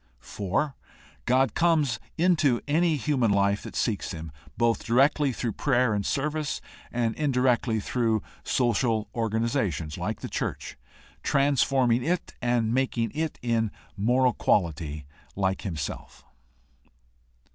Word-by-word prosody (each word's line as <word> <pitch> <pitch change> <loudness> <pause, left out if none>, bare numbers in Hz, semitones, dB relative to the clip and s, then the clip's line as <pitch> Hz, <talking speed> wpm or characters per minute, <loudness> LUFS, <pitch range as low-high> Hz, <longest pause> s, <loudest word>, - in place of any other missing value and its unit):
4. 100 - -2 0.5
God 130 -1 +3
comes 155 -8 +2 0.2
into 155 -8 +3
any 160 +2 +3
human 130 -3 +1
life 100 0 +2
that - - -9
seeks 110 -5 -1
him, 80 -1 -7 0.3
both 115 -1 +2
directly 135 +4 +3
through 120 -1 -2
prayer 125 0 +2
and 100 -1 0
service, 150 +5 -1 0.3
and 120 -2 0
indirectly 125 -5 +2
through 110 0 0 0.2
social 115 -3 +1
organizations 110 - -1
like - - -3
the - - -4
church, - - -4 0.5
transforming 135 - +2
it 175 +4 -1
and 120 -2 +1
making 125 -3 0
it 155 +1 -3
in 115 -2 +1 0.3
moral 125 +5 +3
quality 80 -8 0 0.3
like 95 -1 0
himself. 80 -8 -6
120 Hz, 115 wpm, -27 LUFS, 105-135 Hz, 0.5 s, God